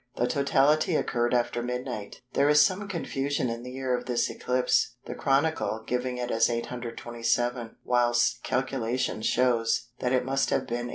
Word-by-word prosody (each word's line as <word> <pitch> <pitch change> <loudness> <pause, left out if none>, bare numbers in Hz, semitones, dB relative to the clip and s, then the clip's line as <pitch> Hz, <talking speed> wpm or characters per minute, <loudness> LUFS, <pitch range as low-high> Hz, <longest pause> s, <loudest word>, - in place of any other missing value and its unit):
The 120 - +1
totality 140 +5 +2
occurred 120 -4 0
after 120 -1 +1
midnight. 125 -4 -5
There 140 +1 +3
is 150 0 +6
some 200 +2 -2
confusion 140 -8 -2
in 115 0 -5
the 125 - -8
year 130 0 -1
of - - -6
this 120 -1 0
eclipse, 125 0 +1
the - - -5
Chronicle 135 -7 0
giving 125 +1 -2
it 125 0 -3
as 115 +1 +3
827, 120 0 -2
whilst 120 0 +2
calculation 130 -3 -1
shows 120 0 +1
that 125 - -1
it 130 -1 +2
must 135 +1 +1
have - - +2
been 120 +1 -3
828. - - -7
125 Hz, 165 wpm, -27 LUFS, 120-135 Hz, -, is